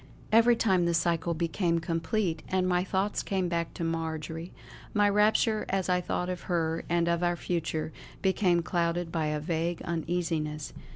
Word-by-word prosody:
Every 230 +2 +6
time 190 -6 +2
the 170 0 +2
cycle 170 0 +1
became 170 +1 0
complete 165 +1 -1
and 185 -1 +1
my 180 0 +2
thoughts 190 +2 0
came 190 -2 -1
back 170 -1 -1
to 175 - -4
Marjory, 165 0 -3 0.4
my 205 0 +5
rapture 215 +2 +3
as 190 -1 0
I 180 0 +3
thought 180 0 -2
of 180 -1 -3
her 165 -2 0
and 170 0 +2
of 170 0 +1
our 175 0 +2
future, 160 -2 -2 0.3
became 185 -3 +3
clouded 170 -1 -1
by 160 -2 0
a 150 0 -1
vague 165 +2 -1
uneasiness. 160 -3 -2
170 Hz, 165 wpm, -29 LUFS, 165-185 Hz, 0.4 s, Every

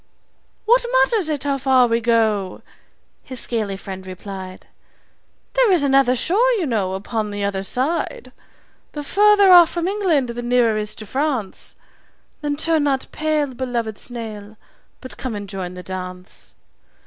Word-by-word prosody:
"What 485 +3 +4 0.2
matters 420 -9 0
it 295 -3 -2
how 280 -1 -1
far 260 -1 +4
we 230 0 0
go?" 220 -5 0 0.6
his 255 -3 -4
scaly 215 -6 -1
friend 190 -1 -8
replied. 185 0 -8 0.9
"There - - +3
is 345 -6 +3
another 270 -2 +3
shore, 400 - +2
you 400 -8 0
know, 205 -8 -1
upon 210 +2 -3
the 205 0 -4
other 200 -1 -1
side. 310 - -2 0.6
The 295 - -5
further 405 +3 +5
off 350 -2 +8
from 345 0 -2
England 365 -10 +1
the 235 +1 -5
nearer 240 -2 +2
is 210 0 -3
to 215 - -9
France 260 -4 -3 0.7
Then 295 -1 -1
turn 320 0 +1
not 270 -2 -1
pale, 305 -3 -1
beloved 240 -4 -3
snail, 220 -3 -7 0.4
but 255 - -9
come 255 -4 -4
and 205 -1 -6
join 185 -2 -6
the 180 - -8
dance. 185 0 -8
245 Hz, 150 wpm, -20 LUFS, 205-305 Hz, 0.9 s, off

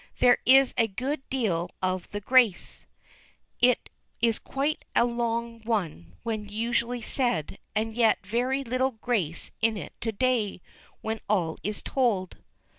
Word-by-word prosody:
There 245 -1 +5
is 270 +1 +7
a 225 - +4
good 260 +8 -3
deal 185 -10 0
of 185 -1 -2
the 205 - -5
grace; 235 -4 +2 0.7
it 250 0 +3 0.3
is 230 -1 +2
quite 285 +3 -2
a - - +5
long 235 -1 -2
one 165 - -2
when 215 -2 -3
usually 235 +2 -1
said, 210 - -1 0.2
and 220 +1 0
yet 225 -3 +3
very 250 +6 0
little 255 +1 0
grace 215 -8 -2
in 225 -1 +2
it 170 - -7
to 225 - -1
day, 225 -3 0 0.4
when 220 0 -3
all 175 -6 +1
is 210 0 -4
told. 220 -9 0
230 Hz, 140 wpm, -27 LUFS, 205-245 Hz, 0.7 s, is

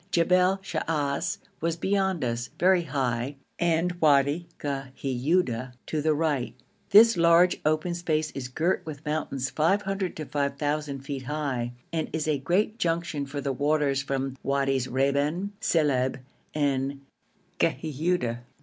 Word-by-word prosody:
Jebel 180 +2 +3
Shaas 150 -5 -1 0.2
was 165 0 0
beyond 190 -2 0
us, 120 0 -2
very 185 +1 +4
high, 130 -1 -1 0.2
and 170 +1 +2
Wadi 145 +2 +3
Ghiuda 135 -1 -1
to 155 - -2
the 155 0 +2
right. 145 -5 -1 0.3
This 220 0 +7
large 170 +1 +5
open 155 +3 +1
space 155 -3 -1
is 130 -2 -5
girt 160 +8 0
with 155 -1 -8
mountains 145 -4 -2
500 195 +3 0
to 155 - -5
5,000 145 0 -2
feet 135 -1 -5
high, 135 -4 -2 0.2
and 160 -1 -1
is 160 -1 -1
a 150 -3 +1
great 200 - 0
junction 165 -5 -1
for 140 +1 -4
the 140 -1 -1
waters 145 0 +1
from 135 -1 -3
Wadis 135 -2 0
Reban, 140 +8 0
Silib, 145 -11 +2 0.4
and 140 -1 0 0.6
Ghiuda. 155 -5 0
150 Hz, 130 wpm, -27 LUFS, 135-170 Hz, 0.6 s, This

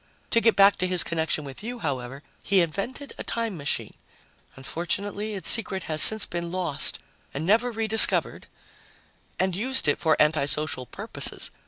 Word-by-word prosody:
To 230 - +3
get 230 -1 +3
back 200 0 +5
to 185 - -1
his 180 -1 +2
connection 160 -2 -2
with 135 +3 -10
you, 240 +3 -6
however, 135 - -5 0.2
he 195 -2 +3
invented 220 - -6
a - - -5
time 230 -4 -4
machine 145 -3 -3 0.6
unfortunately, 200 +9 -4
its 190 -4 -3
secret 190 -5 +2
has 155 -1 +1
since 220 -1 +5
been 170 -1 -6
lost 175 -6 0 0.4
and 145 +3 -4
never 225 +6 +2
re 225 -1 -3
discovered 220 0 +4 0.9
and 185 -1 -1
used 255 -2 +1
it 145 - +1
for 160 -2 +1
anti 150 -1 +2
social 145 -3 -2
purposes. - - 0
185 Hz, 165 wpm, -24 LUFS, 155-215 Hz, 0.9 s, back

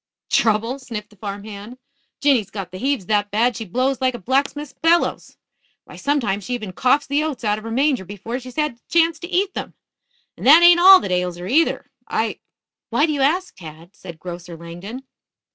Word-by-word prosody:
"Trouble?" 230 +4 +1
sniffed 215 -5 -7
the - - -19
farm 200 0 -6
hand. 215 +3 -9 0.4
"Jinny's 260 -9 +2
got 195 -3 -7
the 185 - -8
heaves 270 -5 -1
that 205 +1 +1
bad 230 +4 +1
she 225 - -5
blows 255 +7 -1
like 255 -1 +1
a - - -4
blacksmith's 280 +5 -1
bellows. 335 +1 0 0.5
Why, - - -14
sometimes 230 -9 -1
she 250 - -2
even 215 -6 -7
coughs 270 +7 +2
the 285 +2 0
oats 305 -6 -4
out 210 -1 0
of - - -14
her 225 - -6
manger 260 -2 +1
before 205 +6 -6
she's 255 -1 -11
had 300 -6 -1
the - - -40
chance 330 -1 +2
to 345 - -8
eat 380 +2 0
them. - - -6 0.6
And - - -3
that 320 +5 +8
ain't 345 0 +8
all 380 +1 +9
that 185 - -4
ails 180 -1 -1
her, 175 - -7
either. 295 - +1 0.2
I - - -2 0.2
" - - -70
"Why 290 - +2
do 310 - -1
you 285 - -2
ask, 350 +7 +1
Tad?" 165 +1 -12
said 175 -3 -11
Grocer 175 0 -8
Langdon. 175 +10 -9
240 Hz, 210 wpm, -21 LUFS, 200-285 Hz, 0.6 s, all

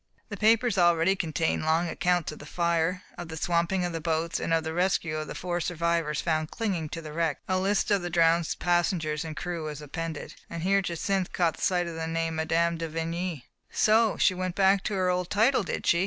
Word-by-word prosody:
The 205 - -5
papers 220 0 +3
already 175 +2 +4
contained 165 -3 -1
long 160 +2 +2
accounts 175 -1 0
of - - -10
the 145 - -10
fire, 170 +2 0 0.2
of 175 - -5
the 160 0 -7
swamping 170 +3 +1
of 175 - -3
the 165 - -3
boats, 165 +1 -1
and - - -3
of 165 -1 +2
the 160 0 -4
rescue 175 -3 0
of 155 0 -4
the - - -7
four 175 -1 -2
survivors 170 -2 0
found 155 -2 0
clinging 185 -9 -2
to 165 +1 -6
the 155 -1 -8
wreck. 160 -3 0
A 185 0 +1
list 200 +2 +1
of 200 -2 +3
the 175 - -3
drowned 165 -1 +3
passengers 175 -3 0
and 160 -2 -7
crew 175 -3 -4
was 150 -1 -5
appended, 155 +2 -5 0.2
and 165 -1 -5
here 195 +2 +3
Jacynth 185 +1 -1
caught 170 -3 +1
sight 180 -1 +2
of 170 - -5
the 160 0 -4
name 165 0 -2
of 160 0 -2
Mme. 170 +1 +2
de 165 0 -3
Vigny. 165 -2 -3 0.2
"So 220 0 +3
she 185 - +4
went 185 -1 -3
back 195 0 +4
to 210 - -1
her 185 -1 +2
old 180 -1 -1
title, 230 +6 +3
did 190 - -4
she?" 170 - +4
170 Hz, 225 wpm, -27 LUFS, 160-185 Hz, 0.2 s, already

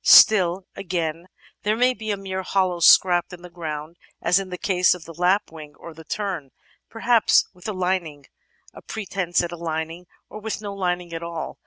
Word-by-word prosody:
Still, 185 -3 +7
again, 170 -2 -3 0.3
there 210 +1 +1
may 250 +2 +3
be 220 -1 -7
a 205 - 0
mere 190 -1 -4
hollow 185 -2 0
scraped 175 +1 +5
in 175 0 -11
the 180 - -11
ground, 160 -1 -6 0.2
as 180 - +3
in 195 -1 -6
the 180 - -5
case 180 -1 +3
of 175 - -12
the 165 - -10
Lap 180 +4 +1
wing 150 -2 -11
or 170 - -11
of - - -16
the 160 - -12
Tern, 185 -8 -4 0.4
perhaps 230 0 +3
with 180 +1 -11
a 215 - -2
lining, 180 -6 -2 0.5
a - - -12
pretence 185 -5 -2
at 175 - -4
a 175 - -6
lining, 165 +1 -4 0.2
or 215 - -9
with 220 0 -4
no 205 -2 -6
lining 180 -3 -2
at 165 - -4
all. 170 -1 -6
180 Hz, 200 wpm, -23 LUFS, 170-195 Hz, 0.5 s, Still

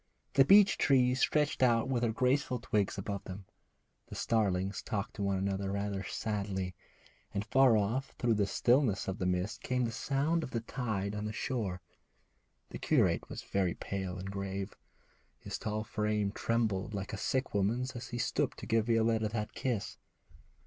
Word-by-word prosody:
The 135 - +7
beech 200 +6 +6
trees 130 -2 +4
stretched 150 -1 +2
out 120 -1 +4
their 120 -3 +1
graceful 125 +2 +1
twigs 105 -6 0
above 100 0 -4
them, 95 +1 -8 0.6
the - - -9
starlings 100 -3 0
talked 100 -2 -3
to - - -4
one 100 -1 +1
another 95 0 -1
rather 100 -1 -2
sadly, 100 -3 -3 0.6
and 100 +1 -1
far 125 0 +5
off 115 +7 -1
through 120 -2 +2
the 105 -2 +1
stillness 115 +2 +2
of 95 +3 -3
the 90 - 0
mist 90 +2 -1
came 125 -1 0
the 115 - -2
sound 145 +7 0
of 155 - -5
the 115 -2 -2
tide 110 -5 -3
on 105 0 -3
the 105 - -2
shore. 110 - -2 0.9
The - - -6
curate - - +2
was - - -6
very 95 -3 0
pale 95 -2 -4
and 95 +1 -5
grave. 100 0 -4 0.6
His - - -6
tall 110 0 -2
frame 105 -2 -1
trembled 110 -3 -1
like 100 -1 -4
a - - 0
sick 130 0 -1
woman's 115 +6 0
as 120 0 -6
he 120 - -5
stooped 120 - 0
to - - -6
give 115 0 +1
Violetta 115 -1 +2
that 105 -1 -3
kiss. 120 -6 -3
110 Hz, 170 wpm, -32 LUFS, 100-125 Hz, 0.9 s, The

